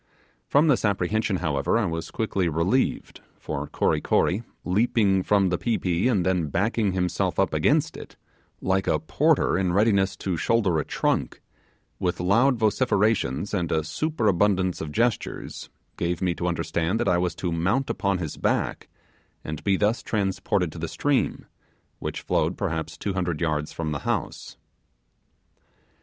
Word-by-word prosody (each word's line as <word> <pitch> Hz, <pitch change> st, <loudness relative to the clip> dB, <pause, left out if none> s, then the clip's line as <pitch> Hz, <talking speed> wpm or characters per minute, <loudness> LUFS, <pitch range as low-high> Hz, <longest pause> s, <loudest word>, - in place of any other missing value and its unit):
From 145 Hz, +3 st, +4 dB
this 140 Hz, -5 st, +3 dB
apprehension, 105 Hz, +1 st, 0 dB
however, 80 Hz, -1 st, 0 dB
I 115 Hz, -, +1 dB
was 80 Hz, -2 st, -3 dB
quickly 100 Hz, -5 st, -1 dB
relieved; 85 Hz, -, 0 dB, 0.2 s
for 70 Hz, +1 st, -4 dB
Kory -, -, 0 dB
Kory, 95 Hz, +6 st, +1 dB, 0.2 s
leaping 100 Hz, 0 st, +2 dB
from 100 Hz, 0 st, +2 dB
the 90 Hz, -, -1 dB
pi 115 Hz, -2 st, 0 dB
pi, 90 Hz, +6 st, 0 dB
and 100 Hz, -8 st, +1 dB
then 90 Hz, -4 st, +1 dB
backing 100 Hz, -, 0 dB
himself 90 Hz, -1 st, -1 dB
up -, -, +1 dB
against -, -, +2 dB
it, -, -, -10 dB, 0.5 s
like 95 Hz, 0 st, 0 dB
a -, -, +3 dB
porter 80 Hz, +3 st, +2 dB
in 90 Hz, -2 st, 0 dB
readiness 100 Hz, -1 st, +2 dB
to 95 Hz, -3 st, -2 dB
shoulder 95 Hz, -3 st, +2 dB
a 75 Hz, -, -2 dB
trunk, -, -, -1 dB, 0.6 s
with 90 Hz, -1 st, -1 dB
loud 115 Hz, +9 st, +3 dB
vociferations 105 Hz, -, +1 dB
and 90 Hz, -4 st, -1 dB
a 80 Hz, -1 st, +1 dB
superabundance 100 Hz, -, +1 dB
of 75 Hz, -, -5 dB
gestures, 115 Hz, +6 st, -2 dB, 0.3 s
gave 85 Hz, 0 st, -1 dB
me 90 Hz, -2 st, +1 dB
to 90 Hz, -, -3 dB
understand 85 Hz, +3 st, -1 dB
that -, -, 0 dB
I 90 Hz, -2 st, +3 dB
was 90 Hz, 0 st, -1 dB
to 90 Hz, -, -3 dB
mount 100 Hz, +12 st, 0 dB
upon 100 Hz, -2 st, 0 dB
his 80 Hz, -5 st, -5 dB
back -, -, -1 dB, 0.6 s
and 75 Hz, -1 st, -6 dB
be 100 Hz, -2 st, +2 dB
thus 105 Hz, +4 st, +1 dB
transported 95 Hz, -4 st, -1 dB
to 80 Hz, -, -9 dB
the 85 Hz, -, -3 dB
stream, 145 Hz, -, 0 dB, 0.5 s
which -, -, -4 dB
flowed 80 Hz, +3 st, 0 dB
perhaps 80 Hz, -5 st, -3 dB
two 100 Hz, -, -3 dB
hundred 90 Hz, -4 st, -2 dB
yards 75 Hz, -2 st, -1 dB
from 80 Hz, -2 st, -4 dB
the 70 Hz, -, -2 dB
house. -, -, -3 dB
95 Hz, 155 wpm, -25 LUFS, 85-105 Hz, 0.6 s, From